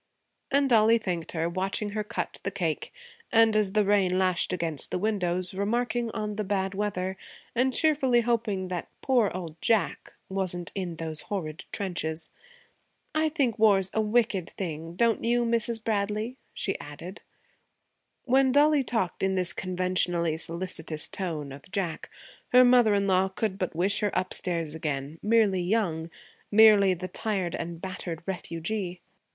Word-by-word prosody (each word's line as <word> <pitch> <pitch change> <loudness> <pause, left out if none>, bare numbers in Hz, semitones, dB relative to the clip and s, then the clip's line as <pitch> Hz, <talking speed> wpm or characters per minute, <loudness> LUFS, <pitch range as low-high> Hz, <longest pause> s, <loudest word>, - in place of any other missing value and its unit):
And 280 0 +3
Dollie 225 -2 +5
thanked 180 -7 -4
her, 165 -1 0
watching 190 +4 -1
her 210 +1 -2
cut 210 - -4
the - - -2
cake, - - -2 0.4
and, 225 -1 +5
as 205 -3 +2
the 210 -1 +3
rain 195 -2 +3
lashed 185 -1 +1
against 165 -5 -2
the - - -1
windows, 185 -3 -1
remarking 235 +4 -1
on 210 -2 -4
the 215 - 0
bad 195 -1 -1
weather 190 -2 -2 0.4
and 255 +2 +2
cheerfully 265 -5 +3
hoping 220 -5 -1
that 180 -2 -4
'poor 245 -6 +3
old 165 -3 -7
Jack' 225 -3 0
wasn't 180 -3 -1
in 180 -4 -4
those 160 -1 -5
horrid 160 -7 -4
trenches. 165 -5 -3 0.8
'I 315 0 +2
think 270 -8 0
war's 195 -4 +4
a 220 - +2
wicked 215 -4 +1
thing, 165 -2 -6
don't 230 +3 +2
you, 240 +1 +2
Mrs. 230 -1 0
Bradley?' 215 +2 -1 0.2
she - - -3
added. - - -9 1.0
When 265 +1 +3
Dollie 290 +1 +4
talked 225 -8 -1
in 190 0 +1
this 180 -2 0
conventionally 180 -3 0
solicitous 165 -2 -5
tone 155 -7 -4
of 140 +6 -12
Jack, 180 -6 -3 0.4
her 250 0 +9
mother 245 -4 +5
in 200 0 +1
law 190 0 +3
could 190 0 -3
but 185 -3 -2
wish 195 +5 +2
her 210 - +1
upstairs 170 -4 +1
again, 150 -1 -4
merely 210 -4 +3
young, 175 -4 0 0.4
merely 205 -3 +6
the 180 +2 -5
tired 190 -2 -2
and 170 0 -5
battered 175 -3 -5
refugee. 180 +1 -4
195 Hz, 150 wpm, -27 LUFS, 175-220 Hz, 1.0 s, her